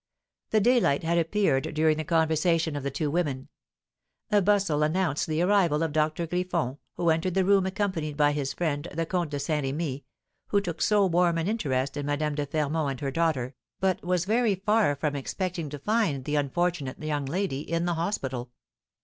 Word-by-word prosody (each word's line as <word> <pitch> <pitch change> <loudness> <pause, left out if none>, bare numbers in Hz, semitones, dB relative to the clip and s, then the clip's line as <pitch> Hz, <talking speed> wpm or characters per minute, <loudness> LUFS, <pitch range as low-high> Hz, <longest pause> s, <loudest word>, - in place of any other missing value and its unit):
The 220 - +3
daylight 225 - +3
had 170 +1 +2
appeared 165 -5 +1
during 155 0 +3
the 155 - -2
conversation 160 0 +1
of 145 - -3
the 140 - -2
two 145 +2 -2
women. 145 -5 -2 0.8
A 205 -1 +5
bustle 195 -6 +2
announced 155 -1 +1
the 160 +2 0
arrival 180 -5 +3
of 160 - -1
Doctor 155 +2 0
Griffon, 165 -6 -2 0.2
who 170 -2 +2
entered 170 +3 0
the 190 -1 +3
room 195 -1 +4
accompanied 190 -7 -2
by 145 -1 +4
his 145 -2 -2
friend, 145 -3 -2
the 165 0 0
Comte 175 -1 -1
de 145 -1 -3
Saint 150 0 -1
Remy, 140 0 -3 0.4
who 205 - +2
took 170 -5 -5
so 210 -2 +4
warm 175 -1 +2
an 165 +1 -1
interest 140 - -1
in 145 0 -3
Madame 150 +1 0
de 145 0 -2
Fermont 150 0 0
and 135 -2 -4
her 135 -1 -2
daughter, 140 -5 0 0.3
but 190 -1 0
was 180 -1 0
very 220 0 +2
far 205 -4 +2
from 145 +1 -2
expecting 170 +3 -3
to 145 - -6
find 175 - 0
the 150 - -1
unfortunate 145 -1 -1
young 150 -3 -2
lady 175 -2 -1
in 165 +3 -2
the 175 - +1
hospital. 135 - -3
160 Hz, 190 wpm, -27 LUFS, 145-180 Hz, 0.8 s, A